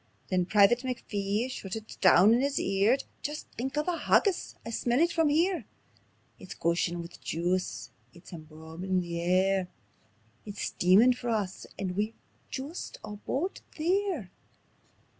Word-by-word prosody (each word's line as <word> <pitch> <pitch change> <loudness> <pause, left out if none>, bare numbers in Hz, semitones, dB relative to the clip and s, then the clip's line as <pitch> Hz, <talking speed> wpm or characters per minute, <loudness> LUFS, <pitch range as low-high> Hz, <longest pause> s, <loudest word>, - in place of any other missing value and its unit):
Then 180 -2 +1
Private 210 +4 +5
McPhee 215 -4 -2
shoutit 220 -3 -7
doon 200 +6 +7
in 240 - +3
his 280 0 0
ear: 200 +6 +3 0.2
"Jist 295 +1 -4
think 265 +4 -4
o' 300 - +2
the 355 +2 -1
haggis! 395 -4 +2
I 230 - -5
smell 240 +2 +1
it 340 +2 +3
from 325 -2 +2
here. 340 +5 +1 0.7
It's 185 - -9
gushin' 170 +1 0
wi' 170 - -8
juice, 180 +3 -2 0.2
it's 175 +1 -15
embaumin' 160 +3 -4
the 170 -1 -4
air; 185 +1 +2 0.8
It's 205 -1 -6
steamin' 200 +8 +5
for 245 -1 -5
us, 205 -4 -2
and 185 -2 -3
we're 210 +3 -1 0.4
jist 285 +6 -6
aboot 235 - -4 0.2
there." 345 - 0
210 Hz, 140 wpm, -29 LUFS, 185-265 Hz, 0.8 s, doon